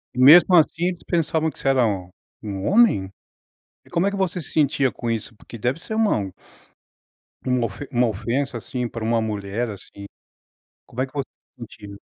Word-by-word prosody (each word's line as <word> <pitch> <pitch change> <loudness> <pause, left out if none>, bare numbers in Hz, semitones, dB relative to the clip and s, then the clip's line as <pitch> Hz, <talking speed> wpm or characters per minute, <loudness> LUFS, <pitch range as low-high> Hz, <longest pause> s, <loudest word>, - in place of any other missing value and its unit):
E - - -4
mesmo 175 +7 +8
assim 165 +1 +3
eles 180 -2 -4
pensavam 160 -2 0
que - - -16
você - - -4
era 130 -3 +4 0.6
um 100 -2 -5
homem? 200 - +4 0.8
E - - -20
como 175 +2 +1
é - - 0
que 200 - -5
você 185 -2 -1
se - - -10
sentia 140 -3 +2
com 120 - -6
isso? 115 0 -3
Porque 115 - -12
deve 125 +7 -1
ser 220 - -6
uma 220 - +2 1.3
uma 125 -2 +1
ofe 130 +8 -9 0.2
ofensa 120 +5 -2
assim, 125 +1 -4
para 115 -1 -7
uma 115 0 +1
mulher, 105 +2 -3
assim. 100 0 -10 0.8
Como 125 +2 -3
é - - -1
que - - -21
v 135 - 0 0.3
sentia? 105 -3 -10
125 Hz, 180 wpm, -22 LUFS, 110-165 Hz, 1.3 s, mesmo